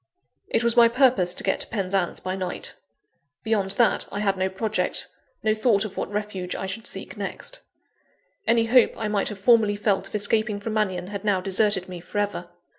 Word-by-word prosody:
It 230 - +1
was 235 0 +2
my 235 -1 +7
purpose 230 -8 +3
to - - -1
get 195 - +1
to - - -1
Penzance 195 -4 -1
by 185 0 -4
night. 185 -2 -2 0.7
Beyond 215 -3 0
that, 235 +2 +2
I 205 - -4
had 195 -2 +1
no 190 0 0
project, 215 +3 -1 0.4
no 215 - +3
thought 215 -2 +2
of 200 -2 -7
what - - -4
refuge 205 -3 -4
I - - -4
should 215 +4 -4
seek - - -5
next. - - -5 0.9
Any 230 0 +4
hope 245 +1 +4
I 220 - -2
might 210 -1 0
have 210 - -7
formerly 215 0 +4
felt 205 -1 0
of - - -8
escaping 210 0 +2
from 215 +2 -4
Mannion, 190 -4 -1
had 200 -1 -6
now 205 -3 +2
deserted 195 0 +1
me 180 -1 -7
for 175 +4 -8
ever. 205 0 -2
205 Hz, 195 wpm, -24 LUFS, 190-220 Hz, 0.9 s, my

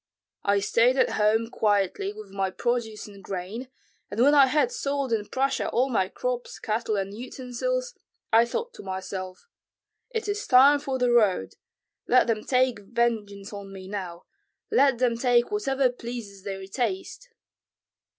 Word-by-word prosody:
I 200 0 +2
stayed 235 +6 +3
at - - +3
home 220 +2 +2
quietly 200 -3 +1
with 210 -2 -11
my 195 -1 -1
produce 225 +1 -2
and 200 -1 -13
grain, 195 +7 -5 0.4
and 205 - -5
when 280 +4 +6
I 280 -2 +7
had 300 - +2
sold 280 - -2
in 210 -2 -1
Prussia 270 +1 0
all 255 +3 +1
my 190 -5 +1
crops, 250 +2 -4
cattle, 220 0 -1
and 195 0 -2
utensils, 260 - -3 0.4
I 230 +1 +7
thought 470 - -4
to - - -10
myself: 190 - -6 0.6
'It 450 -3 -3
is 415 0 -2
time 275 +3 +7
for 275 -2 -3
the 250 -1 +2
road. 205 - +3 0.5
Let 255 - +5
them 220 -2 -1
take 255 -3 +2
vengeance 205 -2 -2
on 200 -1 -8
me 190 -1 -9
now, 185 -4 -6 0.5
let 280 - +4
them 240 -1 +1
take 240 - +2
whatever 270 -11 +1
pleases 235 -5 -8
their 195 -1 -6
taste.'" 375 - -3
235 Hz, 155 wpm, -26 LUFS, 200-260 Hz, 0.6 s, I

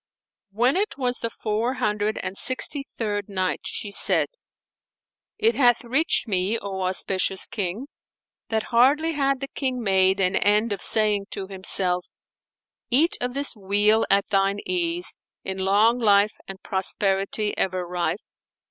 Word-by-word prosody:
When 240 - +1
it 410 -5 -2
was 250 -2 -1
the 230 - -3
Four 225 +3 -2
Hundred 210 0 -1
and 185 - -5
Sixty 275 +4 0
third 205 -3 -3
Night, 185 -2 -2
She 205 - -4
said, - - +4 1.1
It 450 +2 +3
hath 245 -3 +3
reached 265 +3 0
me, 195 +2 0
O 195 -3 -6
auspicious 185 +1 0
King, 205 +4 -4 0.6
that 220 -1 -1
hardly 285 +7 +3
had 275 -2 0
the 275 - -3
King 255 -3 -4
made 190 -1 +2
an 185 0 +1
end 210 +2 +2
of 200 - -4
saying 210 -2 +2
to 195 - -5
himself, 185 -2 +1 0.8
"Eat 300 +8 +3
of 245 +1 -3
this 280 -2 +2
weal 210 +2 +2
at 200 0 +3
thine 195 -1 +1
ease, 350 -1 -1 0.3
in 190 0 -4
long 210 +5 +3
life 205 -2 +3
and 195 0 -10
prosperity 195 +2 -1
ever 185 -1 -2
rife!" 175 0 -3
210 Hz, 145 wpm, -23 LUFS, 195-250 Hz, 1.1 s, said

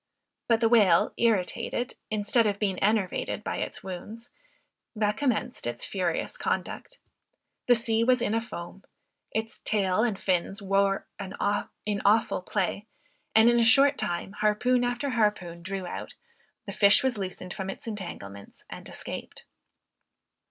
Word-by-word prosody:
But 230 -1 +3
the 225 - +5
whale 205 -7 +4
irritated, 230 +2 0 0.2
instead 215 +1 +2
of 200 -1 0
being 195 -3 -1
enervated 205 -2 0
by - - -3
its - - -4
wounds, 210 +5 -8 0.6
recommenced 215 - 0
its 120 0 -1
furious 180 -4 -2
conduct. - - -3 0.7
The 245 - +6
sea 230 -1 +1
was 250 +1 +4
in 225 -2 0
a 225 - +1
foam. 195 -4 -8 0.5
Its 220 0 -3
tail 200 -2 +1
and 225 -4 +1
fins 190 +2 0
wore 195 0 +1
in 195 -1 -6
awful 205 +1 0
play; 200 +2 -2 0.5
and 220 +1 +7
in 240 0 +5
a - - +4
short 275 +5 +5
time, 175 +2 -2
harpoon 215 +5 +1
after 245 +3 -1
harpoon 210 -7 0
drew 190 +1 -4
out, - - -7 0.5
the - - -6
fish 205 +7 +5
was 255 -5 0
loosened 185 -1 -5
from 190 0 -5
its - - -7
entanglements 170 - -8
and - - -9
escaped. - - -7
210 Hz, 140 wpm, -27 LUFS, 190-230 Hz, 0.7 s, and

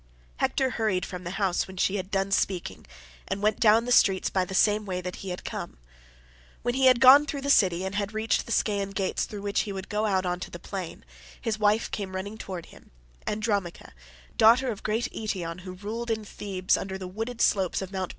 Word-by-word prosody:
Hector 265 -1 +1
hurried 215 -6 0
from 180 -1 -8
the - - -3
house 195 -4 0
when 190 0 -11
she 195 +2 +1
had 185 -1 -5
done 195 0 -1
speaking, 180 - -1 0.4
and 200 - -3
went 215 -1 +2
down 225 +1 +5
the 245 - -3
streets 195 -5 +4
by 185 -1 +1
the 190 - -6
same 210 +2 +3
way 185 -3 -3
that 180 0 -6
he 195 - -7
had 180 - -6
come. - - -6 0.9
When 245 +1 0
he 265 +1 +4
had 255 -2 +6
gone 270 +3 +8
through 285 -3 -3
the 280 +1 +1
city 185 -6 +3
and 190 - -4
had 205 0 -2
reached 220 +1 0
the - - -6
Scaean 200 -3 0
gates 195 -1 0
through 205 -2 -8
which 200 0 0
he 205 - -1
would 190 -1 -6
go 210 +1 0
out 190 -2 +1
on 180 0 -1
to - - -6
the - - -8
plain, 180 - -7 0.3
his 220 -2 -2
wife 210 +1 +2
came 190 -2 -4
running 200 +4 -5
towards 185 -5 -7
him, - - -17 0.4
Andromache, 210 -4 -2 0.5
daughter 240 +3 +5
of 205 - -7
great 225 +3 -1
Eetion 180 -6 -4
who 185 0 -8
ruled 220 +5 -5
in 220 -1 -1
Thebe 190 -3 -6
under 190 0 -4
the 185 -1 -6
wooded 225 +5 -5
slopes 190 -6 +2
of 190 -1 -6
Mt. 190 -2 -3
200 Hz, 220 wpm, -27 LUFS, 185-220 Hz, 0.9 s, gone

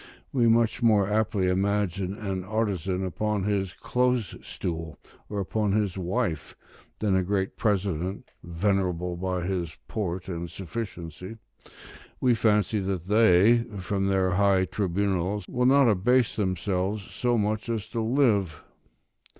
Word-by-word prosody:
We 120 -4 +3
much 115 +1 +3
more 105 -4 +4
aptly 105 -2 +1
imagine 95 0 0
an 95 -3 -3
artisan 95 -3 -1
upon 105 +4 -1
his 95 -3 -1
close 125 +1 0
stool, 80 -2 -5 0.3
or 105 - -3
upon 100 +1 0
his 105 -4 0
wife, 90 -3 -2 0.4
than 105 -3 +1
a 95 - +3
great 95 +1 -1
president 95 -3 -1
venerable 90 0 -1
by 90 0 -2
his 90 -3 -3
port 95 -4 -3
and 85 -2 -4
sufficiency: 95 -1 -7 0.8
we 125 -1 +3
fancy 110 -1 +2
that 95 -3 -3
they, 105 +2 +5 0.2
from 95 +1 -1
their 95 -1 +2
high 95 0 +3
tribunals, 95 0 -1
will 125 0 +1
not 135 0 +5
abase 115 +4 +2
themselves 95 0 -1
so 120 +3 -1
much 110 +2 -1
as 110 -2 -2
to 115 -1 -2
live. 110 - +1
100 Hz, 130 wpm, -26 LUFS, 90-110 Hz, 0.8 s, they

